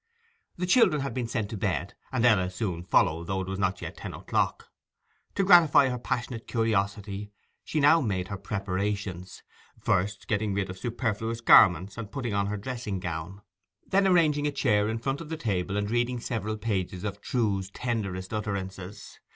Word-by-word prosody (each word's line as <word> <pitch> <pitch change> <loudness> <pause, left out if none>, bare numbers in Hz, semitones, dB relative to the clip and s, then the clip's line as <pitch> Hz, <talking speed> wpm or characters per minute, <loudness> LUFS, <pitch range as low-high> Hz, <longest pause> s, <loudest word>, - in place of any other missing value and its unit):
The 180 - -1
children 180 - +4
had 135 -3 -3
been 125 -1 -2
sent 110 -2 -3
to 110 - -4
bed, - - -2 0.2
and 125 -2 +1
Ella 95 -6 +4
soon 90 -2 -3
followed, 85 -1 +2
though 95 -1 -1
it 95 - -5
was 95 0 -4
not 95 -1 -1
yet - - -7
ten - - -7
o'clock. - - -1 0.7
To 195 - +2
gratify 170 -7 +6
her 125 -1 -3
passionate 120 -1 -3
curiosity 105 -2 -1 0.3
she 155 - -2
now 150 +3 +6
made 95 -7 -2
her 100 - -4
preparations, 100 -2 -3 0.4
first 100 +3 0
getting 105 -1 0
rid 95 -2 -1
of 95 - -10
superfluous 115 -1 -2
garments 95 -1 +6
and 110 -2 -6
putting 125 -6 -3
on 100 0 +1
her 105 +1 -2
dressing 110 -3 -4
gown, 85 +3 -5 0.4
then 195 0 +3
arranging 155 -5 +3
a - - 0
chair 105 -7 +2
in 110 - -1
front 135 +5 -2
of 160 - -9
the 160 - -3
table 100 -5 -1
and 105 +1 -1
reading 120 +1 0
several 110 -3 -3
pages 95 -4 -2
of 100 -1 -4
Trewe's 100 -7 -1
tenderest 100 -4 -3
utterances. 100 -2 -5
105 Hz, 175 wpm, -27 LUFS, 95-120 Hz, 0.7 s, gratify